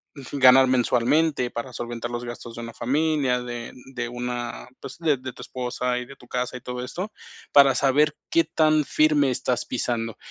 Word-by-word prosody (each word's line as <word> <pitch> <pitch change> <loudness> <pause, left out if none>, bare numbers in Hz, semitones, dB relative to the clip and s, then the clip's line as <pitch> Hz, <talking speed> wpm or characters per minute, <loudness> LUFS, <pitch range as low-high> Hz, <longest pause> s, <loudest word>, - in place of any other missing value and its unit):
ujú, 140 +1 -7
ganar 130 0 +7
mensualmente 125 +2 +2
para 120 +2 -6
solventar 120 0 -5
los 120 0 -4
gastos 120 -1 -8
de 120 - -6
una 115 0 -7
familia 140 -2 +1
de 120 -1 -6 0.2
de 120 -1 -2
una 120 0 -5
pues, 135 - -9
de 155 -5 +2
de 130 0 -7
tu - - -12
esposa, 125 0 -2
y 125 - -4
de 140 - -12
tu - - -18
casa, 125 0 -3
y 125 - -7
todo 125 0 -5
esto 185 +10 -5 0.4
para 140 -2 +7
saber 145 +3 +3
qué 165 - +4
tan 155 -1 +2
firme 145 -2 +3
estás 125 0 -1
pisando. 115 -2 -2
125 Hz, 185 wpm, -24 LUFS, 120-140 Hz, 0.4 s, ganar